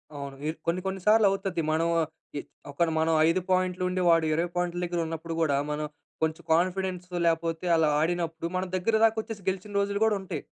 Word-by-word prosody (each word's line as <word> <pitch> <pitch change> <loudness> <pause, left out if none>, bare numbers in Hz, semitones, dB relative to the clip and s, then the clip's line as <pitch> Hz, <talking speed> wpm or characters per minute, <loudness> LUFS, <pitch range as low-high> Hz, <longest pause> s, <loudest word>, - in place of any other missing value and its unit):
అవును. 140 -1 -6
ఇ - - +1 0.2
కొన్ని, 175 +2 +1
కొన్ని 190 0 -3
సార్లు 215 0 +6
అవుతది. 195 -3 -2
మనం 165 +2 +1 0.5
ఎద్ - - -9 0.2
ఒకటి 165 +3 +1
మనం 160 +1 +2
5 175 +3 +2
పాయింట్లు 185 0 +1
ఉండి, 185 0 -1
వాడు 165 -1 +5
20 170 +2 0
పాయింట్ల 175 0 -1
దగ్గర 175 0 -2
ఉన్నప్పుడు 165 +1 -5
కూడా 145 -4 +2
మనం 150 +1 -2 0.4
కొంచెం 160 +2 -1
కాన్ఫిడెన్స్ 180 +1 0 0.2
లేకపోతే 165 0 0
అలా 160 -1 +3
ఆడినప్పుడు, 165 0 -1
మన 185 - 0
దగ్గర 195 +5 +1
దాక 225 0 +5
వచ్చేసి, 220 -2 -8
గెలిచిన 190 +2 -5
రోజులు 200 0 0
కూడా 220 -1 +3
ఉంటాయి. 190 - -5
175 Hz, 190 wpm, -27 LUFS, 165-190 Hz, 0.5 s, సార్లు